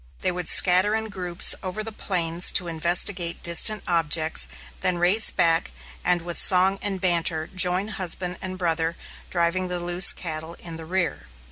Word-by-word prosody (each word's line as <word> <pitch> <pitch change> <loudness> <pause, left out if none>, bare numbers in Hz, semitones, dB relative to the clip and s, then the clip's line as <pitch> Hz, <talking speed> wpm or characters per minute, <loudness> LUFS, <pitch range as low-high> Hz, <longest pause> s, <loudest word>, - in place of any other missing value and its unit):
They - - 0
would 180 0 -6
scatter 185 +4 +3
in 220 0 -4
groups 180 -3 +2
over 190 +3 -5
the 225 - -6
plains 175 -4 0
to 180 - +1
investigate 170 +1 -1
distant 185 +5 +3
objects, 160 -2 0 0.3
then 180 -1 0
race 185 +5 +4
back, 165 - +1 0.3
and 175 -1 0
with 175 0 -3
song 190 +1 +3
and 195 -2 -2
banter 170 -3 0
join 185 +2 +2
husband 180 -2 -3
and 185 0 -6
brother, 165 -2 -2 0.3
driving 175 +1 -1
the 180 0 -4
loose 175 +1 +5
cattle 160 -1 -7
in 165 -1 -9
the 165 - -10
rear. 180 +1 -3
180 Hz, 160 wpm, -23 LUFS, 170-185 Hz, 0.3 s, loose